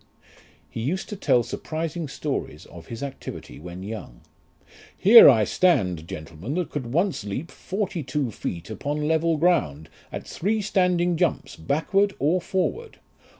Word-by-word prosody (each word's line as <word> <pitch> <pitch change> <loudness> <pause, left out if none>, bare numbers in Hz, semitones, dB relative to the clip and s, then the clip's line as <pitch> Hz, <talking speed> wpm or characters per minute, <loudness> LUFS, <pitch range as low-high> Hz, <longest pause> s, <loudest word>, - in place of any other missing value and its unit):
He 115 - -6
used 170 +11 -2
to 210 - -4
tell 125 -10 +2
surprising 160 +6 -4
stories 140 +1 -4
of 85 -1 -13
his 115 +3 -6
activity 140 -2 -7
when 90 +3 -8
young. 100 - -8 0.8
"Here 230 0 +10
I 115 -5 +5
stand, 95 - +1
gentlemen, 85 - -6
that 180 -3 -2
could 130 -5 -4
once 175 - 0
leap 105 +11 -5
forty 195 -3 -3
two 135 -2 -2
feet 90 -1 -6
upon 145 +7 -2
level 160 0 +2
ground, 80 - +1 0.2
at - - -6
three 215 +5 -1
standing 180 -4 +1
jumps, 175 -3 -1
backward 195 - +1
or 165 +6 +1
forward. 430 - -2
150 Hz, 145 wpm, -24 LUFS, 110-180 Hz, 0.8 s, Here